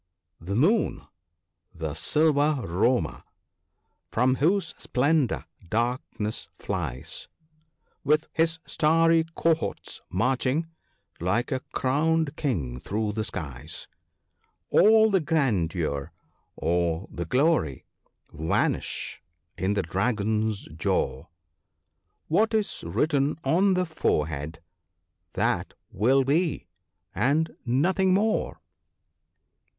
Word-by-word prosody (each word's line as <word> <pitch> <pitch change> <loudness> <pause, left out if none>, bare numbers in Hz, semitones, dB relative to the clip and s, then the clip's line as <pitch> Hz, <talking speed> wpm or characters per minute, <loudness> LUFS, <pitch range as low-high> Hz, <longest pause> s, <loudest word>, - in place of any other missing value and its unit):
the 95 +4 -4
Moon, 190 - +2 0.7
the 80 -3 -4
silver 150 - +2
roamer, 100 +9 +1 0.9
from 125 +3 +2
whose 170 +2 +2
splendour 140 0 +1 0.2
dark 120 +4 +1 0.2
ness 105 0 -3
flies 65 +1 -4 0.8
With 150 +2 +3
his 165 0 +1
starry 165 +1 +3
cohorts 165 -1 -1
marching, 130 - +1 0.5
like 105 - 0
a 130 - 0
crowned 155 +3 +1
king 80 - -2
through 105 +7 -2
the 110 +1 -2
skies; 75 - -5 0.8
All 220 +1 +6
the 195 - +4
grandeur, 90 - 0 0.4
all 85 +1 0
the 85 - -4
glory, 130 - +1 0.5
vanish 80 +2 -1 0.3
in 95 +2 0
the 100 - +1
Dragon's 105 +3 0
jaw 65 -4 -1 0.5
(); - - -50
What 220 +7 +2
is 215 -2 -1
written 145 -2 +1
on 190 +3 +3
the 180 0 +1
forehead, 80 - -2 0.7
that - - 0 0.2
will 130 +7 +3
be, 155 +4 0 0.5
and 150 +5 +1
nothing 185 +9 +3
more." 215 +2 0
130 Hz, 95 wpm, -26 LUFS, -, 0.9 s, All